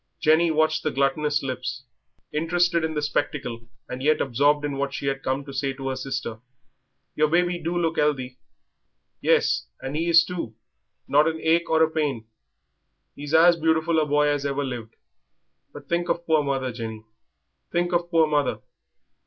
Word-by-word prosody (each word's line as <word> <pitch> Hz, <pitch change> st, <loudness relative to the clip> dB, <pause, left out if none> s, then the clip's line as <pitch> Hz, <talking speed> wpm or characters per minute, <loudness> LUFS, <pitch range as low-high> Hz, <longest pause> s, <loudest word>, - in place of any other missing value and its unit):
Jenny 160 Hz, +2 st, +4 dB
watched 155 Hz, 0 st, +2 dB
the 155 Hz, -, -1 dB
gluttonous 145 Hz, +1 st, 0 dB
lips, 130 Hz, 0 st, -4 dB, 0.5 s
interested 170 Hz, +2 st, +1 dB
in 160 Hz, -1 st, -2 dB
the 150 Hz, -, -1 dB
spectacle, 140 Hz, -5 st, -3 dB, 0.2 s
and 125 Hz, -, -6 dB
yet 155 Hz, +3 st, +2 dB
absorbed 145 Hz, +3 st, +2 dB
in 140 Hz, -2 st, -3 dB
what 140 Hz, 0 st, -2 dB
she -, -, -5 dB
had 135 Hz, 0 st, -1 dB
come 135 Hz, +1 st, -2 dB
to 140 Hz, -, -9 dB
say 135 Hz, 0 st, -1 dB
to 135 Hz, 0 st, -5 dB
her 130 Hz, -, -2 dB
sister. 130 Hz, -4 st, -4 dB, 0.8 s
"Your 155 Hz, 0 st, +3 dB
baby 175 Hz, +2 st, +1 dB
do 170 Hz, +1 st, -2 dB
look 165 Hz, -1 st, 0 dB
'ealthy." 130 Hz, -4 st, -1 dB, 0.8 s
"Yes, -, -, +2 dB
and 135 Hz, +2 st, -5 dB
he 165 Hz, +2 st, 0 dB
is 165 Hz, 0 st, +7 dB
too, 165 Hz, -11 st, -5 dB, 0.5 s
not 150 Hz, +2 st, +4 dB
an 160 Hz, 0 st, -1 dB
ache 165 Hz, +2 st, +1 dB
or 160 Hz, 0 st, +4 dB
a -, -, +4 dB
pain. 145 Hz, -8 st, -1 dB, 0.9 s
He's 145 Hz, +2 st, -3 dB
as 170 Hz, +1 st, +6 dB
beautiful 160 Hz, 0 st, +2 dB
a 155 Hz, -, +2 dB
boy 150 Hz, 0 st, +3 dB
as 145 Hz, -1 st, 0 dB
ever 140 Hz, 0 st, -1 dB
lived. 120 Hz, -4 st, -6 dB, 0.8 s
But -, -, -12 dB
think 175 Hz, 0 st, -1 dB
of 170 Hz, -, -1 dB
poor 155 Hz, -2 st, +3 dB
mother, 135 Hz, -2 st, -1 dB
Jenny, 110 Hz, -2 st, -7 dB, 0.7 s
think 175 Hz, +1 st, 0 dB
of 175 Hz, 0 st, 0 dB
poor 165 Hz, -2 st, +4 dB
mother." 150 Hz, -2 st, 0 dB
150 Hz, 175 wpm, -24 LUFS, 135-160 Hz, 0.9 s, is